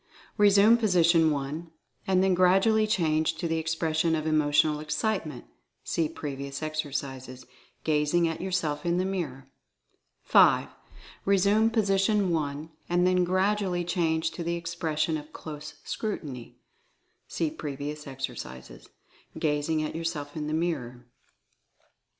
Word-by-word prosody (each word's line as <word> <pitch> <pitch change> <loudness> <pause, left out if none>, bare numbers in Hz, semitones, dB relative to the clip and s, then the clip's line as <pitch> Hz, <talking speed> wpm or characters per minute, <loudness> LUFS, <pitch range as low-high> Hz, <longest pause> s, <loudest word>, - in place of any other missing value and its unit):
Resume 205 +2 +6
position 170 -7 +4
1, 150 +3 -3 0.4
and 190 -1 +3
then 190 -1 +3
gradually 195 +5 +4
change 160 -5 +1
to 170 - -3
the 165 0 0
expression 160 0 0
of 155 -1 -3
Emotional 150 -1 +2
Excitement 155 - -2 0.4
(see 160 -2 -1
pre 145 -3 -5
vious 140 +2 -6
exercises) 135 -4 -4 0.4
gazing 155 +2 +2
at 165 - -4
yourself 180 -6 -1
in 175 0 +1
the 185 - +1
mirror. 140 -9 -4 0.7
5. - - +5 0.5
Resume 200 +3 +3
position 200 -3 +2
1, 150 -1 -2 0.2
and 175 +1 +2
then 180 0 +3
gradually 185 0 +1
change 165 -2 0
to 170 - -6
the 170 +1 -1
expression 165 -2 -2
of 150 0 -10
Close 150 -1 -8
Scrutiny 145 - -5 0.7
(see 160 -2 -2
previous 150 0 -6
ex 135 0 -3
ercises), 65 - -10 0.5
gazing 155 +1 0
at 155 - -4
yourself 160 -3 -4
in 150 -1 -3
the 155 - -2
mirror. 125 -8 -3
160 Hz, 125 wpm, -27 LUFS, 150-180 Hz, 0.7 s, Resume